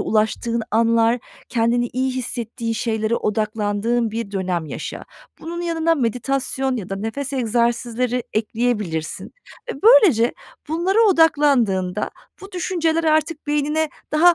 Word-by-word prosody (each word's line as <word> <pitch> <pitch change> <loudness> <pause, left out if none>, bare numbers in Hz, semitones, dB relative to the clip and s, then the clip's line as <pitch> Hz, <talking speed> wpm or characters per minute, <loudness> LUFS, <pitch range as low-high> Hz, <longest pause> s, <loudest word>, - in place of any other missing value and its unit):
ulaştığın 225 +2 0
anlar, 230 +1 +3 0.3
kendini 240 0 +1
iyi 260 +1 0
hissettiğin 235 -2 -3
şeylere 220 0 -1
odaklandığın 215 +2 0
bir 225 -2 -4
dönem 180 -4 -2
yaşa. - - -6 0.4
Bunun 340 +2 -5
yanına 330 -1 +1
meditasyon 265 +1 -1
ya 200 -6 -5
da 195 - -3
nefes 225 +7 -4
egzersizleri 240 0 0
ekleyebilirsin 215 -7 -2 0.4
ve 275 - -12
böylece 400 - +6 0.4
bunlara 355 +7 +1
odaklandığında 280 - +3 0.3
bu 390 0 -11
düşünceler 330 -2 0
artık 310 0 +1
beynine 300 +2 0 0.2
daha 345 +3 +6
240 Hz, 115 wpm, -21 LUFS, 220-310 Hz, 0.4 s, böylece